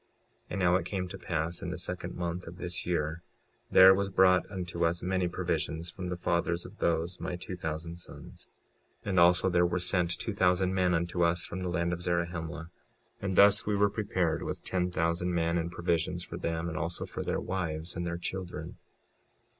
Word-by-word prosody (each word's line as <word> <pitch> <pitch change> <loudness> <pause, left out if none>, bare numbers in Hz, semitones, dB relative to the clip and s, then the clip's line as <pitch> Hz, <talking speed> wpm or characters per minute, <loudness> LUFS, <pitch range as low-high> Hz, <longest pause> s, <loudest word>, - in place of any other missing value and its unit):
56:27 - - -41 0.4
And - - -3
now 90 -1 +4
it - - -4
came 95 -2 -2
to - - -7
pass 85 0 -2
in - - -4
the - - -4
second - - -4
month 85 0 -3
of 85 +1 -9
this 90 -1 -4
year, 80 -1 -1 0.5
there 95 0 +9
was 100 +1 0
brought 95 -1 +4
unto 90 -3 -3
us 85 +1 +1
many 95 0 +1
provisions 85 -1 -2
from 90 -1 -6
the 90 - -3
fathers 85 0 0
of 105 - -12
those 85 +2 0
my 90 +1 -3
two 90 +1 -6
thousand 85 -1 -4
sons. - - -10 0.6
56:28 - - -5
And 95 -2 +3
also 90 +2 +5
there 90 0 +4
were 90 +1 -1
sent 90 -1 +1
two 110 - -3
thousand 95 -1 +2
men 90 -1 +2
unto 85 +1 -1
us 85 0 +2
from 95 - -5
the 90 -1 -2
land 85 0 0
of 90 - -4
Zarahemla. 85 -1 -2 0.5
And 95 -1 -2
thus 100 +2 +6
we 105 - +2
were 100 0 +3
prepared 95 -6 0
with - - -4
ten 90 -1 0
thousand 85 +1 0
men, 85 0 +1
and 85 +1 -3
provisions 85 0 -1
for 85 - -7
them, 85 -1 -2
and 80 -1 -3
also 85 0 -2
for - - -6
their - - -1
wives 85 -3 -3
and 85 - -2
their 85 0 -2
children. 90 +1 -5
85 Hz, 205 wpm, -30 LUFS, 85-90 Hz, 0.6 s, there